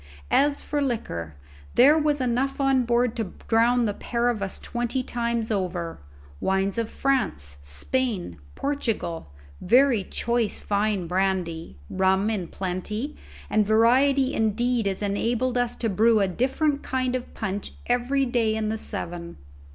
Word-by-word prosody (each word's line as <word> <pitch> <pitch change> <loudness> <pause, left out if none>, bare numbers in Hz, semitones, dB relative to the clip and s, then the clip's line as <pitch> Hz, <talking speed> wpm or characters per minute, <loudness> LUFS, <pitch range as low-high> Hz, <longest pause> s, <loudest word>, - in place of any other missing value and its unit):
As 285 0 +3
for 290 -1 -1
liquor, 85 - -3 0.4
there 275 +5 +7
was 300 -2 +2
enough 255 +2 0
on 270 -2 +3
board 240 0 +2
to 220 -5 -3
drown 235 +1 +3
the 205 - 0
pair 240 +3 -1
of 225 -4 -2
us 195 -1 -3
twenty 240 +2 -2
times 235 -2 -2
over: 180 -4 -2 0.4
wines 195 +3 0
of 225 -1 -2
France, 75 - -1
Spain, 175 - -2 0.2
Portugal, 225 - -2 0.3
very 245 0 +4
choice 235 +2 -1
fine 205 -2 0
brandy, 180 - -1
rum 190 +3 +2
in 190 -6 -2
plenty, 205 - -4 0.4
such 215 - +3
variety 255 +6 +4
indeed 225 +1 +1
as 195 +1 -2
enabled 235 +5 0
us 245 -1 +1
to 230 - -2
brew 220 +2 +4
a 200 - +3
different 275 - 0
kind 255 -1 -1
of 250 - -5
punch 195 +1 -4
every 250 +3 +1
day 235 -3 +1
in 215 -1 -1
the 220 0 -2
seven. 170 -3 -4
230 Hz, 145 wpm, -25 LUFS, 195-250 Hz, 0.4 s, there